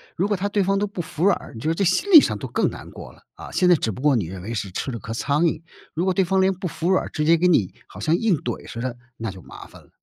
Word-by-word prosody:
如 190 +4 0
果 205 -2 0
他 200 +2 -1
对 205 -1 +1
方 195 +1 +1
都 205 - +1
不 195 -3 -5
服 165 +2 -3
软 200 - +5
儿， - - -12
你 - - -7
就 155 - -2
是 - - +2
这 200 - 0
心 195 - +1
理 315 -5 +11
上 - - -1
都 - - -6
更 - - 0
难 - - -10
过 - - -10
了， - - -22
啊， - - -11
现 180 - +2
在 175 - +7
只 115 - -2
不 100 - -9
过 145 -3 +3
你 105 -7 0
认 90 +1 -8
为 115 +3 -5
是 100 -3 -3
吃 130 - -4
了 115 - -5
颗 110 - -8
苍 145 +7 0
蝇， 155 - 0 0.4
如 170 +3 0
果 190 - +2
对 190 - +2
方 190 +2 +1
连 190 0 +3
不 185 0 -5
服 170 +3 -2
软 190 - +2
儿 - - -7
直 150 -1 -2
接 165 +1 +6
给 180 +2 +2
你 110 - +2
好 - - -12
像 160 +2 +1
硬 205 -2 +2
怼 120 -3 -5
似 115 - -6
的， 125 -1 -3 0.2
那 115 -3 -4
就 95 -1 -12
麻 - - -12
烦 - - -16
了。 - - -24
170 Hz, 365 characters per minute, -23 LUFS, 120-190 Hz, 0.4 s, 理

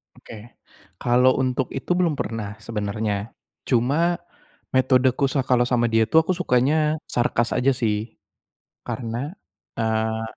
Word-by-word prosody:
Oke, - - -13 0.7
kalau 125 +1 +4
untuk 130 0 0
itu 135 - -5
belum 170 -4 +1
pernah 105 -2 -4
sebenarnya. 105 -1 -3 0.4
Cuma, 145 +8 +2 0.6
metodeku 130 +1 +3
sa 135 - +1
kalau 125 -2 +3
sama 120 -1 +1
dia 115 0 +3
tuh 160 - +6
aku 185 - +1
sukanya 150 0 +2
sarkas 120 -1 0
aja 125 +2 +3
sih. 110 -3 -2 0.7
Karena, 120 +6 -4 0.5
eee, 110 0 0
125 Hz, 120 wpm, -23 LUFS, 110-135 Hz, 0.7 s, tuh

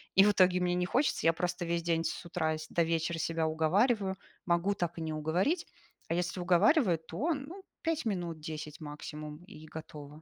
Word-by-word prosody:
И 195 - +8
в 210 - +6
итоге 185 -2 +4
мне 180 0 +1
не 180 0 +1
хочется, 265 +10 +1
я 165 - +6
просто 175 +1 -2
весь 170 0 0
день 165 -1 +1
с - - -3
утра 160 -2 -1
с 155 - -8
до 170 - +2
вечера 165 0 0
себя 165 0 0
уговариваю, 190 +6 +2 0.3
могу 175 +3 +2
так 175 -2 -2
и - - -4
не 160 -1 -2
уговорить, 175 - 0 0.4
а - - -1
если 180 +1 -1
уговариваю, 185 - +4
то, 220 - -1
ну, 315 +8 -7 0.2
5 325 -5 -1
минут, 175 -6 -2
10 155 -1 -6
максимум- 150 +1 -7
и 155 -6 -12
готово. 150 -1 -9
170 Hz, 195 wpm, -31 LUFS, 160-195 Hz, 0.4 s, И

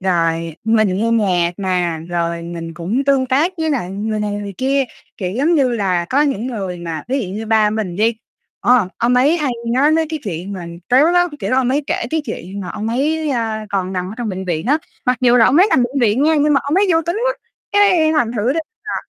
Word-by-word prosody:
rồi 165 -3 0
mình 215 -4 +2
nghe 225 +3 0
nhạc 185 -7 +2
nà, 180 -4 -1
rồi 170 -1 -2
mình 170 -1 -7
cũng 195 - -2
tương 270 -2 +3
tác 290 +8 +2
với 320 -1 0
lại 240 -11 -2
người 215 +2 -3
này 210 -1 -1
người 205 -1 -5
kia. 270 +1 +1 0.3
Kiểu 185 -2 -3
giống 285 - +2
như 275 -5 +3
là 190 -7 0
có 265 +11 +2
những 270 -6 -1
người 195 -7 -4
mà 165 -3 -5
ví 270 +2 0
dụ 190 - -5
như 220 +1 -5
ba 215 -1 +3
mình 210 -5 -3
đi, 225 +2 +2 0.4
ờ, 245 -6 +3
ông 240 +1 +2
ấy 275 +7 +4
hay 300 -5 -1 0.2
nói 280 +4 +4
mấy 320 0 +2
cái 315 - -2
chuyện 185 0 -5
mà 180 -3 -6 0.2
tếu 265 +5 +5
lắm, 355 0 +3
kiểu, - - -2
ông 260 -1 +2
ấy 280 +3 0
kể - - -1
cái 315 -1 0
chuyện 200 -5 -6
mà 185 - -6
ông 215 +1 -4
ấy, 300 +6 0
a, 220 -4 -2
còn 190 -2 -1
nằm 185 0 -3
ở - - -8
trong 240 -2 -3
bệnh 190 -1 -4
viện 170 0 -2
á, 290 +4 +3 0.3
mặc 250 0 +3
dù 245 -1 +4
là 230 - +6
ông 270 - +3
ấy 370 +4 +6
nằm 255 - +4
bệnh 260 +3 -1
viện 235 +2 +2
nha 315 +2 +4
nhưng 295 0 +3
mà 275 - +3
ông 285 +2 -2
ấy 395 +2 +4
vui 325 0 +3
tính 340 - -1
quá, - - +2 0.4
cái 370 -6 +4
thành 245 -7 +1
thử 225 +5 +1
ra 325 - -1 0.2
là, - - -4
225 Hz, 250 wpm, -18 LUFS, 185-280 Hz, 0.4 s, là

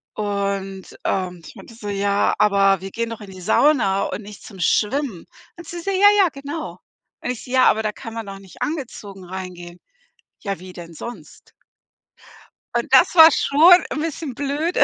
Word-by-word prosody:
Und, 200 -2 -3
ähm, 180 -2 -2
ich - - -12
meinte 230 - -13
so: 210 -2 -7
„Ja, 200 0 +1
aber 195 -2 +3
wir 195 - -7
gehen 230 +2 -3
doch 225 -1 -7
in 195 -2 -10
die 185 - -11
Sauna 200 - +3
und - - -5
nicht 210 0 -12
zum 195 -4 -12
Schwimmen.“ 215 - 0 0.3
Und 340 -2 -11
sie 345 0 -6
so: 395 - -2
„Ja, 390 +1 +5
ja, 380 -4 +5
genau.“ 290 +3 -7 0.4
Und 250 - -2
ich 245 - -7
so: 250 - -11
„Ja, 260 0 +4
aber 220 - +3
da 215 - -1
kann 225 0 -9
man 225 -1 -5
doch 195 0 -8
nicht 195 -2 -16
angezogen 225 - -5
reingehen.“ 180 -1 -8 0.6
„Ja, 200 -2 -4
wie 185 0 -10
denn 170 -1 -10
sonst?“ 195 -3 -10 1.2
Und - - -2
das - - +6
war 320 -1 +10
schon 335 +8 +5
'n 305 - -3
bisschen 315 -3 -4
blöde, 290 +5 -1
210 Hz, 185 wpm, -21 LUFS, 195-285 Hz, 1.2 s, war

